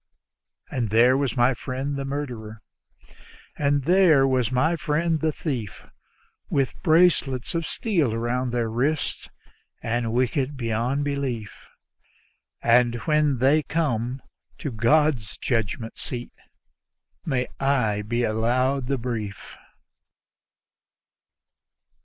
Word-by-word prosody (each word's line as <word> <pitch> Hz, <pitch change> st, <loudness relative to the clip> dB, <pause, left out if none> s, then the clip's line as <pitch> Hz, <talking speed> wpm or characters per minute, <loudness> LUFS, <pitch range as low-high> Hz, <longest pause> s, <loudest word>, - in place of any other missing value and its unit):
And 120 Hz, -4 st, -1 dB
there 120 Hz, +4 st, +5 dB
was 135 Hz, -2 st, -1 dB
my 120 Hz, +2 st, +4 dB
friend 130 Hz, +4 st, -4 dB
the 140 Hz, 0 st, -3 dB
murderer, 120 Hz, -6 st, -5 dB, 0.9 s
and 145 Hz, -1 st, +1 dB
there 170 Hz, -4 st, +5 dB
was 130 Hz, -3 st, +1 dB
my 155 Hz, +7 st, +2 dB
friend 160 Hz, +1 st, 0 dB
the 160 Hz, 0 st, +1 dB
thief, 125 Hz, -, -5 dB, 0.6 s
With 135 Hz, -3 st, -1 dB
bracelets 160 Hz, -7 st, +3 dB
of 165 Hz, -1 st, -2 dB
steel 175 Hz, -, 0 dB
around 120 Hz, +3 st, -1 dB
their 120 Hz, -1 st, -1 dB
wrists, 135 Hz, +7 st, -1 dB, 0.5 s
and 115 Hz, 0 st, -1 dB
wicked 130 Hz, +3 st, 0 dB
beyond 120 Hz, +4 st, -1 dB
belief: 135 Hz, -7 st, -4 dB, 0.9 s
But 120 Hz, 0 st, +4 dB
when 150 Hz, -3 st, +2 dB
they 135 Hz, +5 st, +4 dB
come 130 Hz, -6 st, -2 dB, 0.3 s
to 145 Hz, -, -4 dB
God's 125 Hz, 0 st, +2 dB
judgment 115 Hz, -1 st, -2 dB
seat 120 Hz, -2 st, -6 dB, 0.9 s
may 130 Hz, -5 st, 0 dB
I 125 Hz, -7 st, +1 dB
be 120 Hz, +3 st, -1 dB
allowed 125 Hz, +4 st, +1 dB
the 135 Hz, 0 st, 0 dB
brief. 110 Hz, -5 st, -5 dB
130 Hz, 105 wpm, -24 LUFS, 115-145 Hz, 0.9 s, there